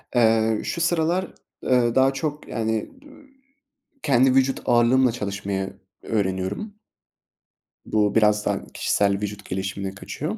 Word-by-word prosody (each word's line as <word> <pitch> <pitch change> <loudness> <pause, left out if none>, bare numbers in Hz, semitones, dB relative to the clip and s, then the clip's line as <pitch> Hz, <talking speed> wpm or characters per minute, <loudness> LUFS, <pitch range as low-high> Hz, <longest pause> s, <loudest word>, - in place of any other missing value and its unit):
Eee, 110 -2 +3
şu 170 - -3
sıralar, 170 +2 +1 0.4
ııı, 120 -2 +2
daha 130 +1 +4
çok, 150 +2 -4
yani, 110 -1 -2
d - - -20 1.0
kendi 130 -1 +4
vücut 135 0 +2
ağırlığımla 120 +1 +4
çalışmayı 100 -3 -4 0.2
öğreniyorum. 100 - -2 1.1
Bu 105 -1 +1
biraz 105 -1 +3
daha - - -2
kişisel 100 -1 +1
vücut 105 -1 -5
gelişimine 95 +1 -4
kaçıyor. 155 - -5
115 Hz, 115 wpm, -23 LUFS, 100-135 Hz, 1.1 s, daha